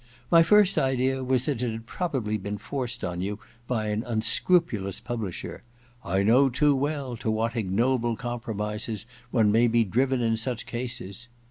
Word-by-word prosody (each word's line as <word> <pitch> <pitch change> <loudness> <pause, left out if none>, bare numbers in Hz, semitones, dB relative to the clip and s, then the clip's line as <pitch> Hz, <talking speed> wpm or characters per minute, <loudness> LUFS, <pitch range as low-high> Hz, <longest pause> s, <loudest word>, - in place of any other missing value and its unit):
My 165 - +8
first 200 +3 +5
idea 130 0 +1
was 130 -1 +1
that 135 -6 -1
it 120 -2 0
had 115 +1 -7
probably 130 - -2
been 105 0 -4
forced 125 0 -4
on 90 -1 -3
you 100 +2 -3 0.3
by 110 -4 -1
an 105 +2 -1
un 110 -2 -1
scrupulous 115 - +1
publisher 115 -7 -5 0.2
— 120 0 -31
^I 95 +2 0
know 130 +5 +5
too 145 +3 +3
well 140 -2 -2
to 115 - -3
what 115 +2 0
ignoble 115 +3 +1
compromises 110 -3 -4 0.2
one 110 -4 +3
may 115 +3 +4
be 115 0 +3
driven 130 +5 +1
in 115 -1 +1
such 120 +1 -2
cases 120 -2 -5
1 - - -33
120 Hz, 175 wpm, -26 LUFS, 110-130 Hz, 0.3 s, My